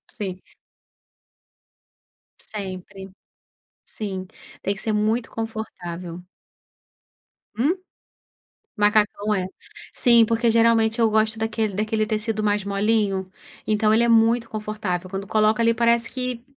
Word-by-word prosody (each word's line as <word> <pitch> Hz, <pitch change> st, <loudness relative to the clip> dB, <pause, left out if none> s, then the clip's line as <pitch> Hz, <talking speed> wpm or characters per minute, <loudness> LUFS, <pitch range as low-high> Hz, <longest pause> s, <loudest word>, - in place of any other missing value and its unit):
Sim. 195 Hz, -6 st, -5 dB, 2.1 s
Sempre. 190 Hz, -1 st, -7 dB, 0.7 s
Sim, 190 Hz, -3 st, -6 dB, 0.4 s
tem 200 Hz, -, 0 dB
que 195 Hz, -, -6 dB
ser 220 Hz, -, -1 dB
muito 220 Hz, +3 st, 0 dB
confortável. 180 Hz, -6 st, -6 dB, 1.4 s
Hum? 295 Hz, +11 st, +2 dB, 1.0 s
Macacão, 210 Hz, 0 st, +2 dB
é. 185 Hz, -2 st, 0 dB, 0.5 s
Sim, 235 Hz, -2 st, +6 dB
porque 230 Hz, +1 st, +1 dB
geralmente 225 Hz, 0 st, +3 dB
eu 225 Hz, -1 st, +4 dB
gosto 220 Hz, +1 st, +1 dB
daquele 220 Hz, -2 st, -1 dB
daquele 215 Hz, +1 st, 0 dB
tecido 215 Hz, 0 st, -2 dB
mais 205 Hz, -1 st, +1 dB
molinho, 200 Hz, -1 st, +1 dB, 0.4 s
então 215 Hz, 0 st, +2 dB
ele 230 Hz, -, +4 dB
é 235 Hz, -, +3 dB
muito 230 Hz, +1 st, +4 dB
confortável, 210 Hz, -4 st, -3 dB
quando 195 Hz, 0 st, -5 dB
coloca 215 Hz, +1 st, +2 dB
ali, 230 Hz, 0 st, +4 dB
parece 235 Hz, 0 st, +2 dB
que 250 Hz, -2 st, -4 dB
215 Hz, 110 wpm, -23 LUFS, 200-230 Hz, 2.1 s, Sim